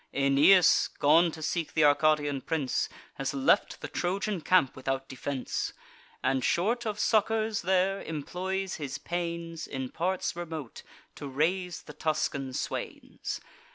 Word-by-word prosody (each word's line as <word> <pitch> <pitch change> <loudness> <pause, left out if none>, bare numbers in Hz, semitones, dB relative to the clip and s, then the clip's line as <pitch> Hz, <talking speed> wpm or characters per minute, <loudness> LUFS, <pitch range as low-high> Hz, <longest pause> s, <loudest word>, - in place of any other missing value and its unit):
Aeneas, 140 +6 +5
gone 165 +4 +5
to 160 0 -8
seek 165 0 -2
th' 155 - +4
Arcadian 145 -1 +3
prince, 145 -2 -1 0.3
Has 135 0 -2
left 135 -1 +2
the - - -4
Trojan 190 +1 -2
camp 180 -6 +3
without 135 0 -3
defence; 130 0 -3 0.5
And, 130 -1 +1
short 225 - +1
of 210 -1 -3
succours 220 0 +2
there, 190 +2 +1
employs 185 +5 -3
his 145 -5 -4
pains 170 -1 -4
In 130 -2 -4
parts 180 +5 -1
remote 160 -7 -6 0.3
to 145 - -7
raise 175 +6 -1
the 150 - -11
Tuscan 140 -3 -1
swains. - - -4
160 Hz, 130 wpm, -29 LUFS, 140-185 Hz, 0.5 s, Aeneas